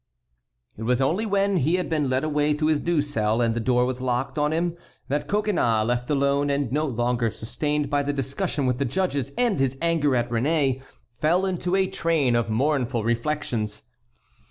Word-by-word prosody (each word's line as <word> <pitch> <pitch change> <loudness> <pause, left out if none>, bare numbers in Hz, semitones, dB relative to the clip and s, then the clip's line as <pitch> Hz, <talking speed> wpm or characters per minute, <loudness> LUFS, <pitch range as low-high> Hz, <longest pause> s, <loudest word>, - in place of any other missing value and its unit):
It - - -9
was 125 +2 +1
only 175 +12 +1
when 200 -1 +2
he 160 +3 +2
had 180 - -1
been 150 -4 0
led 130 +1 +1
away 150 -1 +1
to 155 +1 -1
his 155 -1 +2
new 170 -4 +1
cell 110 -6 0
and 115 -1 +2
the 120 - -2
door 125 +1 +2
was 125 0 -3
locked 125 0 -1
on 150 0 +1
him 170 +1 0 0.3
that 145 +2 -1
Coconnas, 185 - +1
left 120 +1 -1
alone, 140 0 +2
and 140 -3 0
no 150 +3 +1
longer 120 -2 0
sustained 145 +7 -2
by 145 0 +2
the 145 0 -1
discussion 140 +2 -2
with 125 0 0
the 140 - +1
judges 140 -1 -1
and 240 - +1
his 135 0 0
anger 165 -5 +1
at 120 0 0
Réné, 135 +2 +1 0.4
fell 170 +5 +2
into 180 -1 -1
a 190 0 +3
train 165 -9 +1
of 120 -1 0
mournful 125 -1 0
reflections. 115 -3 -2
140 Hz, 190 wpm, -24 LUFS, 125-160 Hz, 0.4 s, a